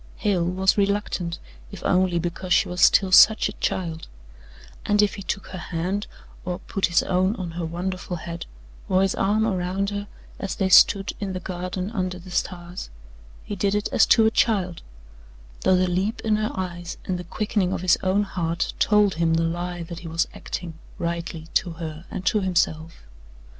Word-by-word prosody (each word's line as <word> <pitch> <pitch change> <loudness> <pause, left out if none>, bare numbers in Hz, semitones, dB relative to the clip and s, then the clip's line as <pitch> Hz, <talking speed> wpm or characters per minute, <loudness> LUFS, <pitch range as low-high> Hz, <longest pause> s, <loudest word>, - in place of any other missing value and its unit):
Hale 195 -5 +1
was 190 +3 +2
reluctant, 195 -4 -1 0.3
if - - -9
only 185 -1 +2
because 175 +2 -4
she - - +4
was 180 0 -4
still 190 -2 +5
such 215 +4 +7
a - - -4
child, 165 -6 -3 0.8
and 205 0 +1
if 205 -1 +4
he 200 - -7
took 195 0 -3
her 185 - -6
hand 180 +5 -3 0.4
or 180 -1 -3
put 190 0 -1
his 170 - +3
own 185 +3 +1
on 185 -6 -5
her 170 0 -4
wonderful 180 +2 -4
head 170 +1 -7 0.4
or 185 +1 +3
his 195 - +1
arm 210 +3 +1
around 190 0 -1
her 205 0 -4 0.3
as 195 -3 -3
they 190 - 0
stood 195 +2 +6
in 200 -2 -3
the 185 - -3
garden 185 +2 -4
under 185 -4 -2
the 180 +1 -12
stars 175 0 -4 0.5
he 205 - -5
did 200 +1 0
it 210 - -1
as - - +4
to 225 - +5
a 220 - +4
child, 190 -7 +1 0.8
though 185 - +3
the 185 0 +3
leap 190 +6 -1
in 215 -1 +1
her 215 0 -1
eyes 175 -2 -5
and 180 -1 -2
the - - -5
quickening 195 +1 -1
of - - -2
his 185 -1 +3
own 190 +2 +2
heart 170 -4 -2
told 210 -2 +4
him 165 0 +1
the 165 - +2
lie 175 +1 -3
that 170 0 -8
he 170 - -9
was 165 +1 0
acting, 175 -3 -6 0.2
rightly, 170 -1 -4
to 175 -3 +1
her 160 0 -7
and 185 - -6
to 210 - +3
himself. 165 - -1
185 Hz, 190 wpm, -24 LUFS, 175-200 Hz, 0.8 s, such